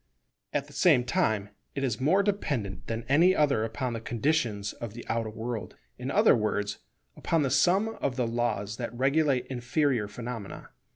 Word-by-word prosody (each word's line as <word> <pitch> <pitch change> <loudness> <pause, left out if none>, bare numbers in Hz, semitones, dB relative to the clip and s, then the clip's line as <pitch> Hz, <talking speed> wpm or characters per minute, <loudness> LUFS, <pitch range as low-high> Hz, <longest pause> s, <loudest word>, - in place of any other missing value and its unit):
At 145 -1 -1
the 145 - -16
same 140 -3 +4
time 110 - 0 0.3
it 140 - -2
is 130 -2 -1
more 185 +9 +4
dependent 140 - -2
than 115 0 -3
any 170 +7 +5
other 140 - +2
upon 120 +3 -3
the 115 - -4
conditions 115 -4 0
of 115 -2 -7
the 120 - -8
outer 115 -1 -1
world; 110 0 -5 0.2
in - - -4
other - - +5
words, 105 -2 -1 0.4
upon 165 -2 +1
the 135 - 0
sum 190 +5 +4
of 135 -3 0
the 125 -2 0
laws 115 -3 -1
that 120 -1 -5
regulate 135 -1 +2
inferior 125 -2 0
phenomena. 115 -1 -7
125 Hz, 170 wpm, -28 LUFS, 110-145 Hz, 0.4 s, any